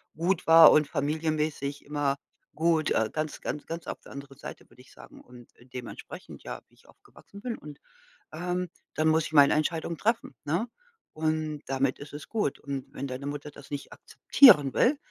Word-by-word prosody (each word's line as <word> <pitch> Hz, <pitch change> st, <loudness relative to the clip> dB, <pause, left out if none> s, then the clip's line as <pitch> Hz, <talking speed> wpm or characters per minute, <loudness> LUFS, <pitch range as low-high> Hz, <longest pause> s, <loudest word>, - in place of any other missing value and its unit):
gut 170 Hz, +2 st, 0 dB
war 165 Hz, -1 st, +10 dB
und 150 Hz, -1 st, +4 dB
familienmäßig 150 Hz, -1 st, -2 dB
immer 145 Hz, -1 st, -1 dB, 0.4 s
gut, 160 Hz, -1 st, +2 dB
äh 110 Hz, -1 st, +1 dB
ganz, 155 Hz, -1 st, -3 dB
ganz, 150 Hz, -, -5 dB
ganz 165 Hz, 0 st, -6 dB
auf -, -, -6 dB
der -, -, -15 dB
anderen 140 Hz, -1 st, -10 dB
Seite, -, -, -9 dB
würde -, -, -19 dB
ich -, -, -20 dB
sagen. -, -, -15 dB
Und, 125 Hz, -1 st, -16 dB
äh, 120 Hz, -, -20 dB
dementsprechend, 125 Hz, 0 st, -9 dB
ja, -, -, -7 dB
wie -, -, -33 dB
ich -, -, -25 dB
aufgewachsen 200 Hz, -, -16 dB
bin 245 Hz, -2 st, -3 dB
und 150 Hz, -6 st, -12 dB, 0.5 s
ähm, 180 Hz, +2 st, -2 dB, 0.3 s
dann 155 Hz, +1 st, +1 dB
muss 160 Hz, 0 st, +2 dB
ich -, -, -12 dB
meine 145 Hz, -2 st, +7 dB
Entscheidung 160 Hz, +2 st, -1 dB
treffen, 225 Hz, -, -1 dB
ne? 170 Hz, +11 st, -1 dB, 0.5 s
Und 155 Hz, -1 st, -2 dB
damit 135 Hz, 0 st, 0 dB
ist 145 Hz, 0 st, -10 dB
es 145 Hz, -, -8 dB
gut. 210 Hz, -11 st, -1 dB
Und 140 Hz, -2 st, -5 dB
wenn -, -, -5 dB
deine 130 Hz, +2 st, -6 dB
Mutter 145 Hz, +1 st, -6 dB
das 140 Hz, -1 st, -14 dB
nicht 145 Hz, -1 st, -6 dB
akzeptieren 150 Hz, -, +5 dB
will 280 Hz, +4 st, +3 dB
150 Hz, 185 wpm, -28 LUFS, 140-165 Hz, 0.5 s, war